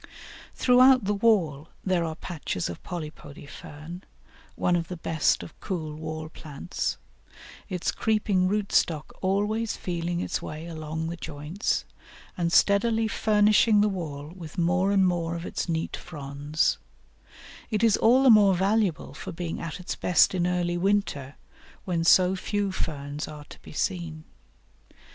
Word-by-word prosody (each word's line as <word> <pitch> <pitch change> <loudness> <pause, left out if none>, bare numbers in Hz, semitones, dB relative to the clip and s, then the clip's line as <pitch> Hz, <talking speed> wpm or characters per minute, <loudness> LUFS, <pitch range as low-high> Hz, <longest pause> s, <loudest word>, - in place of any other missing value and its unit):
] - - -17
Throughout 255 0 +6
the 205 - +1
wall 185 -9 +2 0.2
there 185 -3 +2
are 160 -1 -3
patches 155 - -4
of 85 - -7
Polypody 155 -4 -8
Fern, 155 +6 -10 0.5
one 180 - +1
of 165 -1 -1
the 180 - -6
best 160 -1 +1
of - - -12
cool 160 -6 -4
wall 155 0 -5
plants, 155 0 -4 0.7
its 180 -3 -1
creeping 210 -4 +1
root 205 +1 -1
stock 155 -3 +1
always 210 +4 0
feeling 175 -1 -3
its - - -2
way 155 +1 -7
along 160 -1 -4
the 170 - -5
joints, 150 +6 -3 0.5
and 170 -1 -1
steadily 220 +4 +3
furnishing 210 0 +4
the 210 - +4
wall 155 -5 -5
with 165 -2 -10
more 180 +3 +2
and 195 -1 +4
more 170 -2 0
of 170 +1 -5
its - - -3
neat 165 -1 -1
fronds; 145 -1 -2 0.9
it 215 -1 -1
is 225 -3 +5
all 250 +4 +4
the 260 - +8
more 205 -3 +6
valuable 195 -6 0
for - - -7
being 170 -1 -5
at 165 0 -5
its 180 - -4
best 180 +1 +4
in 175 -1 +1
early 175 -1 0
winter, 180 -8 0 0.5
when 175 -4 0
so 185 +2 +5
few 200 +1 -1
ferns 145 -4 -4
are 150 -1 -9
to - - -14
be - - -12
seen. 160 -1 -3
175 Hz, 155 wpm, -26 LUFS, 155-200 Hz, 0.9 s, the